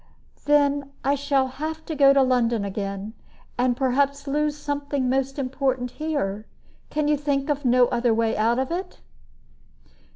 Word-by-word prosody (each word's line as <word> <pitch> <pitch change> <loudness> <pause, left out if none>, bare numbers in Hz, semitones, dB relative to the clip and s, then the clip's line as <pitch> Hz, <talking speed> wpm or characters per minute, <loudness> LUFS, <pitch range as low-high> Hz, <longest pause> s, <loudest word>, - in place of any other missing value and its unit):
"Then 285 -1 +2
I 275 +2 +2
shall 280 -1 +1
have 315 +4 -5
to 320 - -4
go 280 -2 +6
to 275 -1 +4
London 240 -4 +1
again, 200 +1 -4 0.4
and 245 0 +1
perhaps 280 +2 +1
lose 295 +1 0
something 285 -2 -2
most 270 +2 0
important 260 -2 -1
here. 220 -10 -3 0.4
Can 300 0 -1
you 300 - +3
think 285 0 -1
of 290 -1 -3
no 250 0 +5
other 240 0 +1
way 225 0 +1
out 230 +3 +2
of 265 +2 -1
it?" 365 +2 -4
275 Hz, 155 wpm, -24 LUFS, 245-290 Hz, 0.4 s, go